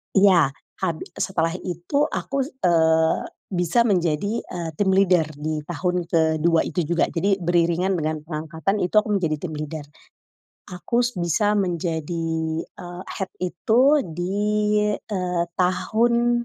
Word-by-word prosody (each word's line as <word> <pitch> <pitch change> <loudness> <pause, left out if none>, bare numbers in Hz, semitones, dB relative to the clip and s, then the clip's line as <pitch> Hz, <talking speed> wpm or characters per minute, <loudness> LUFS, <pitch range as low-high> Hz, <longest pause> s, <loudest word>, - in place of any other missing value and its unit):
Iya, 185 -8 +5 0.3
habi 170 -4 -2
setelah 165 -4 0
itu 180 - -1
aku, 275 -3 -3 0.2
eee, 160 -2 +3 0.3
bisa 180 +4 +1
menjadi, 185 +2 0
eee, 170 -2 -5
team 195 -2 +2
leader 185 -4 +4
di 155 +1 -3
tahun 180 +1 -1
ke-2 160 0 +2
itu 175 - -1
juga. 170 +2 +1
Jadi, 195 +3 +1
beriringan 175 +2 +1
dengan 155 -2 -1
pengangkatan 160 +4 -3
itu 180 - -3
aku 215 - -3
menjadi 165 -5 0
team 160 -2 -5
leader. 150 0 -5 0.9
Aku 210 +7 -1
s 240 -3 -3
bisa 180 +5 +1
menjadi, 170 -3 -2 0.4
eee, 175 +1 -10
head 190 -2 -4
itu 185 +6 +1 0.2
di, 175 +4 -4 0.6
eee, 180 -4 -2
tahun 235 +6 +2
175 Hz, 130 wpm, -23 LUFS, 160-195 Hz, 0.9 s, Iya